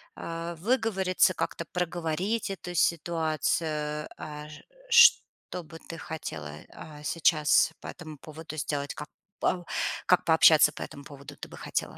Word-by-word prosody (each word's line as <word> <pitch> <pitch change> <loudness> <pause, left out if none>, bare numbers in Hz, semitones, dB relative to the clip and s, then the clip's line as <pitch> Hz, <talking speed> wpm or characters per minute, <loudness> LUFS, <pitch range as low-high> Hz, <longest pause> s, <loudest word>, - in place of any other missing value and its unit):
а, 165 +1 -5
выговориться, 190 -3 +2
как-то 170 - -3
проговорить 180 +5 -1
эту 180 -2 -6
ситуацию, 155 -2 0
а, 150 0 -7
ж 155 - -11 0.3
что 470 - +5
бы 165 +1 -12
ты 165 - -7
хотела, 80 - -6 0.2
а, 150 -1 -11
сейчас 160 -1 +3
по - - -8
этому 155 -4 -9
поводу 155 +1 -9
сделать, 145 -1 -2
как 150 - -7 0.3
пау 175 -2 0 0.4
как 180 0 +3
пообщаться 160 -1 +7
по - - -10
этому 140 - -8
поводу 140 0 -11
ты - - -8
бы - - -11
хотела? - - -3
165 Hz, 140 wpm, -28 LUFS, 150-180 Hz, 0.4 s, пообщаться